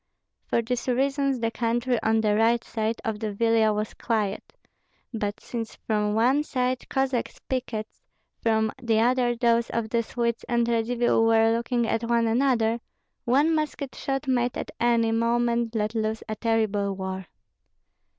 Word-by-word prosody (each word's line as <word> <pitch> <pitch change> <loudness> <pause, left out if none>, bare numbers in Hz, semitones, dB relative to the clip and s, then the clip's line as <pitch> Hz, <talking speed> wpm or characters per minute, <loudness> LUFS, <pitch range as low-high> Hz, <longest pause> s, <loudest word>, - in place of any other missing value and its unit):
For 235 - +1
these 245 +2 -3
reasons 275 +1 +1
the 230 0 0
country 240 +1 0
on 220 0 +2
the 210 -1 +2
right 230 +2 +3
side 220 0 -2
of 220 -2 -2
the 215 -1 -2
Vilia 225 +1 +3
was 210 0 -2
quiet; 215 -4 -2 0.6
but 205 -2 -3
since 230 -2 -6
from 210 -1 -1
one 255 +6 +3
side 255 -3 -2
Cossack 265 -2 0 0.2
pickets, 235 -4 -4 0.4
from 220 -1 +2
the 225 -2 +2
other 245 +1 +2
those 235 0 +2
of 230 -1 -2
the 235 - +2
Swedes 235 0 -2
and 235 -1 +2
Radzivill 235 0 +2
were 225 0 +4
looking 235 0 0
at 225 0 -1
one 235 -1 +3
another, 230 -1 +2 0.5
one 285 +6 +3
musket 300 -3 -2
shot 270 +1 -3
might 245 -1 +1
at - - -5
any 235 -1 +3
moment 235 0 +1
let 215 0 0
loose 220 -1 -2
a 215 - -3
terrible 215 -3 0
war. 190 -1 -5
230 Hz, 155 wpm, -26 LUFS, 220-245 Hz, 0.6 s, were